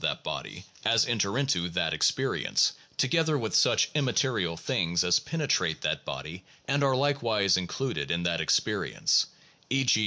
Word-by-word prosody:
XXI 110 -4 -1
that 90 0 0
experience, - - +1 0.2
together 160 +3 +2
with 110 -5 -4
such - - +3
immaterial 125 - 0
things 85 0 0
as 90 -1 +3
pene 160 -3 -4
trate 80 -9 0
that - - -2
body 90 +4 -7 0.2
and 140 +1 +1
are 135 -1 +3
likewise 120 -8 +2
included 105 +8 -3
in 85 0 -1
that 85 -1 0
experience, 80 - +1 0.4
e. 135 +1 +2
g. 125 -4 +3
110 Hz, 130 wpm, -28 LUFS, 90-135 Hz, 0.4 s, such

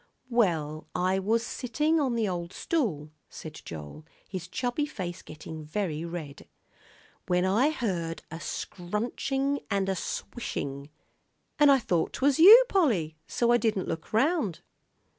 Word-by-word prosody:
"Well, 160 -10 +1
I 185 +2 +1
was 225 +4 +1
sittin' 300 +7 0
on 260 -5 +1
the 225 -2 +1
old 175 -1 -4
stool," 175 - -1 0.2
said 155 - -9
Joel, 80 - -8 0.2
his 185 -3 -6
chubby 245 - -1
face 185 - -6
getting 155 0 -9
very 160 -1 -3
red, 165 -5 -7 0.8
"when 180 0 +2
I 220 +10 +3
heard 180 - -3
a 165 - -6
scrunchin' 250 +12 -2
an' 200 -2 0
a 190 - 0
swishin', 140 - -5 0.7
an' 295 -1 +7
I 275 - +7
thought 175 -9 0
'twas 275 +1 +2
you, 440 +9 +10
Polly, 215 - +1
so 235 0 +1
I 240 - +6
didn't 215 -4 0
look 160 - -5
round." 265 - +1
195 Hz, 140 wpm, -28 LUFS, 165-255 Hz, 0.8 s, you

